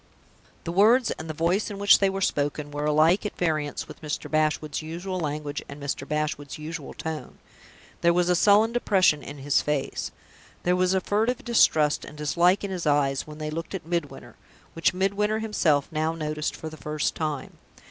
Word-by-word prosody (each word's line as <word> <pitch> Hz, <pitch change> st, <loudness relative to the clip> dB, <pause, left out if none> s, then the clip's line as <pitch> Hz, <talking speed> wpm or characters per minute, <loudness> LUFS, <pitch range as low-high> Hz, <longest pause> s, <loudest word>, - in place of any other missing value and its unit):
The 170 Hz, -, -4 dB
words, 220 Hz, +7 st, +4 dB
and 160 Hz, 0 st, -6 dB
the -, -, -2 dB
voice 175 Hz, +7 st, +1 dB
in 205 Hz, -, -6 dB
which 200 Hz, 0 st, +6 dB
they 195 Hz, -, +3 dB
were 195 Hz, 0 st, -3 dB
spoken, 145 Hz, -3 st, -1 dB
were 145 Hz, 0 st, -3 dB
alike 155 Hz, +5 st, +4 dB
at 210 Hz, -, -5 dB
variance 155 Hz, -4 st, -1 dB
with 150 Hz, -, -12 dB
Mr. 150 Hz, -1 st, -4 dB
Bashwood's 155 Hz, -1 st, 0 dB
usual 175 Hz, +4 st, -5 dB
language 150 Hz, -2 st, -3 dB
and 140 Hz, +1 st, -9 dB
Mr. 140 Hz, -1 st, -4 dB
Bashwood's 150 Hz, -2 st, -3 dB
usual 155 Hz, -1 st, -7 dB
tone. 160 Hz, -1 st, -6 dB, 0.6 s
There 170 Hz, -, +5 dB
was 175 Hz, 0 st, +2 dB
a 180 Hz, -, +3 dB
sullen 210 Hz, +5 st, +5 dB
depression 190 Hz, -10 st, +3 dB
in 145 Hz, -, -8 dB
his 140 Hz, 0 st, +1 dB
face 150 Hz, -2 st, -2 dB, 0.5 s
there 180 Hz, +1 st, +2 dB
was 185 Hz, +1 st, +2 dB
a 190 Hz, -, +2 dB
furtive 220 Hz, +6 st, 0 dB
distrust 155 Hz, -10 st, +3 dB
and 150 Hz, -, -10 dB
dislike 170 Hz, +6 st, +2 dB
in 200 Hz, -, -3 dB
his 175 Hz, -4 st, -3 dB
eyes 140 Hz, -2 st, +1 dB
when 150 Hz, 0 st, -9 dB
they 155 Hz, 0 st, -4 dB
looked 165 Hz, +4 st, -5 dB
at 175 Hz, -, -6 dB
Midwinter, 170 Hz, -3 st, -4 dB, 0.4 s
which 165 Hz, -, +2 dB
Midwinter 200 Hz, +3 st, +1 dB
himself 175 Hz, -10 st, +1 dB
now 160 Hz, +1 st, 0 dB
noticed 155 Hz, -1 st, -3 dB
for 160 Hz, -, -7 dB
the 155 Hz, -, -11 dB
first 150 Hz, -1 st, -2 dB
time. 155 Hz, -3 st, -4 dB
160 Hz, 190 wpm, -26 LUFS, 150-190 Hz, 0.6 s, which